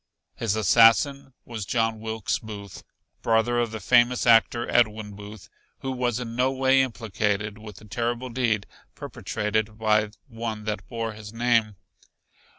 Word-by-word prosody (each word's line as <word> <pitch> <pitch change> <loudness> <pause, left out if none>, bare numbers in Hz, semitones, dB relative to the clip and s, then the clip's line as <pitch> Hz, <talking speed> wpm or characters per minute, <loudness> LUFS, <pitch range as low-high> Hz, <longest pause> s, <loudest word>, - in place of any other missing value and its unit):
His 110 -2 -1
assassin 115 +6 +4
was 115 -3 -6
John 115 +2 0
Wilkes 110 -1 -2
Booth, 100 -3 -9 0.4
brother 115 +1 +2
of 120 -1 0
the 110 0 -6
famous 120 +4 +3
actor, 120 0 +4
Edwin 110 -3 +1
Booth, 105 0 -11 0.3
who 135 - -3
was 125 -2 -1
in 115 -2 -6
no 130 +2 +2
way 135 0 +3
implicated 105 -4 -2
with 105 -2 -10
the 105 - -14
terrible 120 +3 -3
deed 115 -4 0 0.3
perpetrated 105 0 -3
by 105 -1 +2 0.2
one 115 -3 -5
that 105 0 -4
bore 115 -2 -4
his 105 -1 -10
name. 115 -2 +1
115 Hz, 145 wpm, -25 LUFS, 105-120 Hz, 0.4 s, assassin